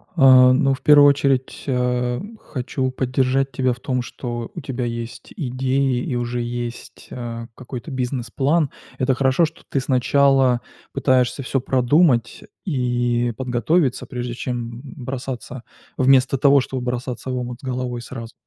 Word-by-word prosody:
А, 130 -4 +7
ну 135 +1 +3
в 135 - -6
1 145 -1 +7
очередь, 135 -2 0
а, 125 -1 0 0.2
хочу 130 0 -3
поддержать 130 +1 0
тебя 130 0 0
в 125 - -12
том, 125 -1 -1
что 120 -1 -6
у - - -5
тебя 125 -2 -3
есть 115 0 -6
идеи 130 -1 0
и 125 - -3
уже 120 0 -2
есть, 120 0 -6
а, 115 -2 -6
какой-то 130 +3 -8
бизнес-план. 130 +4 0 0.3
Это 130 0 +2
хорошо, 135 +5 +3
что 160 - -9
ты 135 - 0
сначала 130 -1 +3 0.3
пытаешься 130 +1 +1
всё 135 +1 0
продумать 130 -1 +2 0.2
и 120 -5 0
подготовиться, 130 +3 0
прежде 125 -1 -4
чем 120 -1 -5
бросаться 130 -2 -6 0.3
вместо 130 0 +4
того, 140 +1 +5
чтобы 130 0 -4
бросаться 125 +1 -4
в 125 - -2
омут 125 0 -5
с - - -30
головой 125 -2 -3
сразу. 115 -2 -8
125 Hz, 145 wpm, -21 LUFS, 120-135 Hz, 0.3 s, А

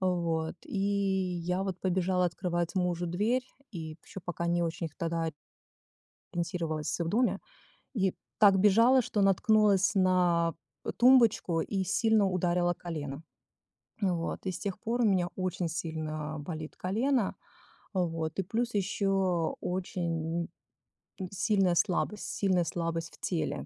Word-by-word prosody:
Вот, 170 -3 0
и - - -5
я 190 -2 0
вот 190 -2 -4
побежала 185 0 +1
открывать 175 0 -2
мужу 175 -1 0
дверь 225 +9 0 0.2
и 160 -5 -6
ещё 195 - -9
пока 170 -1 -3
не 170 0 +1
очень 165 0 -2
тогда 165 -1 -1 1.0
ориентировалась 165 -2 -2
в 165 - 0
доме 240 +7 +1 0.5
и 190 -5 +1 0.2
так 200 -2 +6
бежала, 230 +7 +6
что 210 -1 -1
наткнулась 195 0 +4
на, 180 -3 +3 0.3
э, - - -2
тумбочку 235 -9 +5
и 195 -2 -2
сильно 220 +1 +3
ударила 175 -1 +1
колено. 150 -4 -6 0.8
Вот 180 -3 -1
и 190 - 0
с - - -5
тех 200 -1 -4
пор 235 +3 -1
у - - +4
меня 185 -4 +2
очень 185 -2 -2
сильно 155 -2 -4
болит 155 0 -6
колено. 230 +4 0 0.6
Вот 165 -3 -1
и - - +2
плюс 230 +5 -2
ещё 195 -4 +1
очень 170 -2 -2 0.8
сильная 195 -2 +2
слабость 185 +5 +1
сильная 185 -4 +1
слабость 165 0 -3
в - - -27
теле, 170 -4 -2
180 Hz, 130 wpm, -30 LUFS, 170-195 Hz, 1.0 s, так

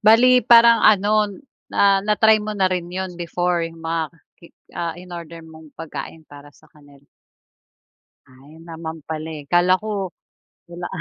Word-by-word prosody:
Bale 240 +4 +5
parang 235 -1 +6
ano, 210 +1 +3
n 205 +8 -13 0.2
na - - 0 0.2
na-try 215 +1 +3
mo 210 0 -5
na 195 - +1
rin 175 -1 -3
yun 185 +1 -5
before 175 0 -2
yung 165 0 -12
mga 165 0 -2 0.4
ki 170 - -15 0.3
ah, 170 -1 -4
inorder 170 -2 -10
mong 160 -1 -14
pagkain 160 0 -8
para 145 -1 -14
sa 145 - -23
kanila? 145 -2 -21 1.2
Ay, 135 +4 -18
naman 160 -1 -7
pala, 155 +1 -6
eh. 145 - -11
Kala 175 +1 +4
ko 205 -3 -3 0.6
wala. 175 0 -7
175 Hz, 155 wpm, -21 LUFS, 160-210 Hz, 1.2 s, parang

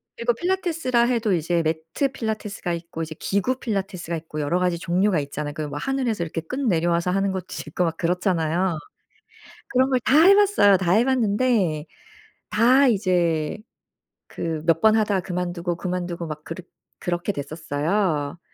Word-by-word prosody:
그리고 240 +1 0
필라테스라 330 -6 0
해도 235 -4 +1
이제 170 0 +1
매트 160 - -1
필라테스가 215 -6 -3
있고 170 -1 -6
이제 160 -1 -5
기구 225 +7 0
필라테스가 195 -6 -3
있고 160 -1 -6
여러 150 +4 0
가지 180 -1 +1
종류가 180 +1 +1
있잖아요. 145 +1 -4
그 155 - -3
뭐 145 - -6
하늘에서 255 - -1
이렇게 165 0 -4
끈 255 - -3
내려와서 170 -1 +1
하는 195 +1 +1
것도 190 -1 -5 0.2
있고 180 - -1
막 165 0 -2
그렇잖아요. 175 -1 0 0.9
그런 260 +1 +2
걸 255 - +3
다 290 +4 +5
해 395 +3 +8
봤어요. 400 - +5
다 180 -2 0
해 220 +6 +4
봤는데 215 - +1 0.7
다 255 +5 +5
이제 175 -6 +1 0.7
그 160 -2 -4
몇 165 -1 +3
번 220 0 +5
하다 210 -3 +2
그만두고, 175 -1 -3
그만두고 175 -1 -3
막 155 -1 -7
그렇 165 +2 -7 0.3
그렇게 175 +2 -2
됐었어요. 155 +1 -2
180 Hz, 350 characters per minute, -23 LUFS, 165-220 Hz, 0.9 s, 해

